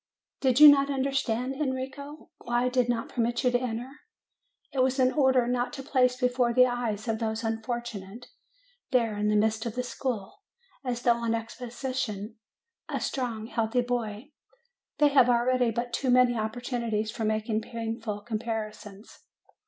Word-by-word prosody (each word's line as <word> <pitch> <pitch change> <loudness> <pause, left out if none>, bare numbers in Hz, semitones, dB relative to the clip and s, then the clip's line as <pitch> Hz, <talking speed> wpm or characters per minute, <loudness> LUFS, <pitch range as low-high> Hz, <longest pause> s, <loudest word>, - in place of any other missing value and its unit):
Did 260 -1 +2
you 300 - +12
not 280 -1 +6
understand, 270 -2 -1
Enrico, 280 +1 -5
why 240 0 0
I - - +2
did 250 -1 +1
not 230 -1 -1
permit 240 +2 -1
you 250 - +3
to 245 - +2
enter? 240 0 -3 0.9
It 270 - -2
was 260 +1 +2
in 255 -1 +4
order 260 -3 +3
not 245 0 -1
to 270 - -6
place 250 -2 +2
before 250 -2 +1
the 255 0 +7
eyes 240 -3 -2
of 220 -1 -1
those 220 0 -2
unfortunates, 225 -1 -4 0.6
there 230 -5 +1
in 210 0 -1
the 210 - +2
midst 220 +2 +1
of 225 - -5
the 250 - -1
school, 245 -5 -4 0.4
as 245 -2 -3
though 235 -1 +4
on 230 -1 0
exhibition, 230 -2 -5 0.5
a - - -2
strong, 235 -5 -3
healthy 230 +1 0
boy: 240 +1 -3 0.7
they 295 0 +5
have 265 -3 +5
already 245 0 +3
but 235 +2 -3
too 265 - -1
many 250 0 +5
opportunities 220 -1 -2
for 225 - -5
making 215 0 0
painful 225 -2 -5
comparisons. 215 -2 -6
240 Hz, 160 wpm, -28 LUFS, 225-255 Hz, 0.9 s, you